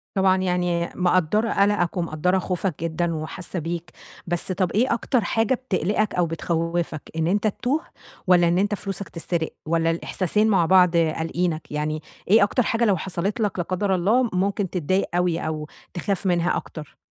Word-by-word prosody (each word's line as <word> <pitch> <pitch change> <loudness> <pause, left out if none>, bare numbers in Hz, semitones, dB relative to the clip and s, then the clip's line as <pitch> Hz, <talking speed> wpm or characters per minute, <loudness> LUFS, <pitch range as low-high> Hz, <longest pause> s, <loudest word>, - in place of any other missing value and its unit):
طبعًا 190 -1 +4
يعني 180 -2 0
مقدّرة 185 +4 +2
قلقَك 200 -3 +2
ومقدّرة 175 +2 +1
خوفك 180 -3 -3
جدًا 165 0 -1
وحاسّه 170 +3 -5
بيك، 170 +1 -5 0.4
بس 175 +2 -1
طب 185 -2 0
إيه 235 +5 +2
أكتر 240 +1 +1
حاجة 225 +4 +1
بتقلقك 215 -4 -1
أو 175 -1 +2
بتخَوّفك، 165 -1 -2
إن 160 0 0
أنت 205 +3 +1
تتوه 255 +8 0 0.5
والّا 175 -2 +5
إن 175 +1 +2
أنت 205 +2 +1
فلوسك 195 0 -5
تتسرق، 165 -1 -2 0.2
والّا 165 +1 +1
الإحساسين 190 +5 0
مع 190 -6 +3
بعض 180 -1 +5
قالقينك؟ 165 0 -1
يعني 150 +1 -2 0.3
إيه 210 +2 +6
أكتر 235 +4 +2
حاجة 230 +2 +1
لو 195 -4 +3
حصلت 190 +6 -3
لك 200 -3 -1
لا - - +1
قدر 190 +1 0
الله 225 +7 +2
ممكن 195 0 0
تتضايق 185 +2 0
أوي، 175 -2 +1
أو 155 -1 -4 0.3
تخاف 195 +2 -2
منها 175 -1 +2
أكتر؟ 150 -3 -9
180 Hz, 165 wpm, -23 LUFS, 165-200 Hz, 0.5 s, إيه